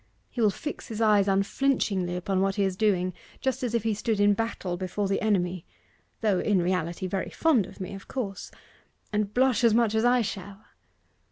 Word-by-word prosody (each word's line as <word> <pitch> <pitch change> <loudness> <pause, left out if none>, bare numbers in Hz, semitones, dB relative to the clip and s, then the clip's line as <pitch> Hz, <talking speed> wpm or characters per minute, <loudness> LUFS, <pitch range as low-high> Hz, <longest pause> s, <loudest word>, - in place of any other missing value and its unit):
He 240 - -3
will 215 - +5
fix 300 +9 -6
his 225 -2 -6
eyes 210 -3 +4
unflinchingly 195 -2 +1
upon 185 +1 -1
what 195 0 +1
he 200 - +1
is 190 -1 0
doing 185 -3 +1 0.3
just 265 0 -1
as 240 -2 -1
if 230 - 0
he 225 -1 +1
stood 215 0 -1
in 205 0 +5
battle 200 -4 -3
before 185 +3 -2
the 195 - 0
enemy 180 -5 0 0.6
(though, 205 -5 +2
in 205 -3 +2
reality, 175 0 -1
very 190 +1 -2
fond 265 - +2
of 190 - -14
me, 185 0 -5
of 195 - -10
course), 200 -7 -4 0.6
and 210 -1 0
blush 250 -1 +2
as 230 -2 +5
much 230 -2 +3
as 220 0 +2
I 245 0 +4
shall. 200 0 -7
205 Hz, 195 wpm, -27 LUFS, 190-225 Hz, 0.6 s, will